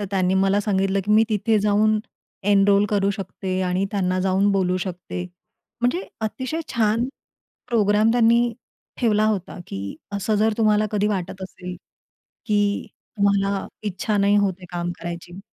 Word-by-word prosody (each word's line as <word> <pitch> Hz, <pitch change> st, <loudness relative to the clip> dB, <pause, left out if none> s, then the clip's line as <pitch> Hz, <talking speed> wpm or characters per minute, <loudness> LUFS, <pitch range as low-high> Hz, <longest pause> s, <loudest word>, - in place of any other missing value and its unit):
तर 205 Hz, -, -2 dB
त्यांनी 185 Hz, -1 st, +1 dB
मला 195 Hz, +1 st, +3 dB
सांगितलं 195 Hz, -1 st, +1 dB
की 210 Hz, -, -2 dB
मी 220 Hz, +1 st, +6 dB
तिथे 220 Hz, 0 st, +2 dB
जाऊन 210 Hz, +1 st, +3 dB, 0.5 s
एनरोल 200 Hz, 0 st, +5 dB
करू 200 Hz, -1 st, +2 dB
शकते 190 Hz, -1 st, -4 dB
आणि 185 Hz, +2 st, +1 dB
त्यांना 185 Hz, -2 st, 0 dB
जाऊन 190 Hz, +2 st, +2 dB
बोलू 185 Hz, -2 st, +1 dB
शकते. 180 Hz, -1 st, -5 dB, 0.6 s
म्हणजे 250 Hz, +10 st, +1 dB, 0.2 s
अतिशय 260 Hz, +8 st, -3 dB
छान 225 Hz, +1 st, +2 dB, 0.6 s
प्रोग्राम 215 Hz, -1 st, +3 dB
त्यांनी 235 Hz, 0 st, +4 dB, 0.5 s
ठेवला 215 Hz, -3 st, +3 dB
होता, 205 Hz, -4 st, -2 dB
की 100 Hz, 0 st, -6 dB, 0.2 s
असं 200 Hz, +2 st, 0 dB
जर 220 Hz, +1 st, +3 dB
तुम्हाला 215 Hz, -1 st, +3 dB
कधी 210 Hz, -1 st, +1 dB
वाटत 190 Hz, -2 st, -3 dB
असेल? 180 Hz, -1 st, -7 dB, 0.7 s
की 205 Hz, -2 st, +1 dB, 0.3 s
तुम्हाला 200 Hz, -1 st, +1 dB, 0.2 s
इच्छा 205 Hz, +1 st, -1 dB
नाही 200 Hz, +1 st, +3 dB
होत 200 Hz, -2 st, +2 dB
आहे 180 Hz, -, -11 dB
काम 175 Hz, 0 st, -2 dB
करायची 175 Hz, +1 st, -7 dB
200 Hz, 145 wpm, -23 LUFS, 190-215 Hz, 0.7 s, मी